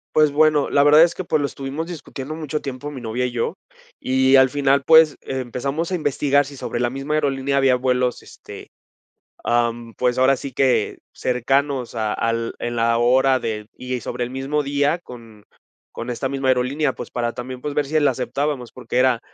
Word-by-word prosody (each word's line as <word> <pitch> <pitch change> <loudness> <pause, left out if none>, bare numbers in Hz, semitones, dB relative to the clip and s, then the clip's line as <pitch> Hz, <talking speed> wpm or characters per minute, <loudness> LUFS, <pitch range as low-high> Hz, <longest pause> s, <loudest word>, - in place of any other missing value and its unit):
Pues 155 -2 +5
bueno, 150 -1 +3
la 140 - +4
verdad 150 +2 +7
es 170 0 +2
que, 185 - -5
pues, 155 -2 0
lo 145 - 0
estuvimos 140 +3 -5
discutiendo 155 -4 -7
mucho 155 -1 -4
tiempo 135 +1 -6
mi 140 -3 -8
novia 120 +2 -2
y 125 - -6
yo. 120 -1 -2 0.4
Y 130 +1 +3
al 130 -1 +6
final, 140 0 +2
pues, 160 0 +7
eh, 130 - -4
empezamos 135 +7 -3
a - - +1
investigar 145 -2 +1
si 140 0 -10
sobre 120 - -4
la 120 0 +1
misma 135 +4 -4
aerolínea 140 -2 0
había 135 -2 +4
vuelos, 125 -1 0
este, - - -12 0.7
ah, 120 0 +2
mm, 115 -1 -12
pues 125 0 0
ahora 135 +1 +4
sí 135 +1 -7
que 130 0 +1 0.2
cercanos 130 +1 -1
a 110 -2 -1
al 115 0 -1
en 120 0 -4
la 115 0 +2
hora 130 +2 +3
de 105 -2 -4
y 125 0 -3
sobre 120 - -3
el 120 - -7
mismo 135 +3 -2
día 145 +3 0
con 115 -9 -13 0.5
con 120 +1 -6
esta 125 +2 -2
misma 135 0 -2
aerolínea, 130 +3 +1
pues, - - -8
para 120 -1 -1
también, 125 +1 -7
pues 150 +2 -4
ver 145 0 0
si 155 +3 +1
la 145 - +4
aceptábamos. 130 0 -3
Porque, 125 -1 -4
era 125 -2 +3
130 Hz, 200 wpm, -21 LUFS, 125-145 Hz, 0.7 s, verdad